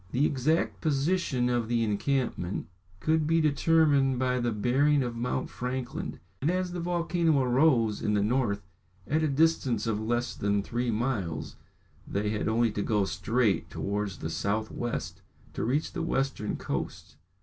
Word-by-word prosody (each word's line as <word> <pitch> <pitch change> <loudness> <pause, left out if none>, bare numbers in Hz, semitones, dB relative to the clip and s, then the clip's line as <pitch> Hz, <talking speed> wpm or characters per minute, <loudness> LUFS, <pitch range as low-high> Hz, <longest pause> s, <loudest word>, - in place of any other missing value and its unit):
The 135 +4 +3
exact 150 +4 0
position 145 -3 +1
of 120 -2 0
the 115 0 +1
encampment 110 -3 -1 0.3
could 155 +5 +1
be 165 +1 +3
determined 145 -3 +3
by 125 0 +1
the 120 -1 0
bearing 135 +6 +2
of 120 -1 -4
Mount 125 +2 -2
Franklin, 125 0 -4 0.2
and 145 - +1
as 180 0 0
the 175 - -4
volcano 170 -2 +1
arose 125 -4 +3
in 105 - +1
the 100 - +2
north 105 -3 0 0.4
at 155 +2 +1
a 155 - +2
distance 140 -6 +2
of 110 -2 -1
less 120 +2 -1
than 100 0 0
three 120 +3 -2
miles, 110 -8 -2 0.5
they 105 +1 -1
had 105 - -1
only 115 +1 +2
to 105 - -2
go 105 -2 +1
straight 95 +3 0
towards 100 -1 -3
the 80 - -4
south 100 +7 -1
west 120 -1 -4 0.3
to - - -3
reach 140 +7 0
the - - -3
western 135 -8 -1
coast. - - -5
125 Hz, 160 wpm, -28 LUFS, 105-145 Hz, 0.5 s, The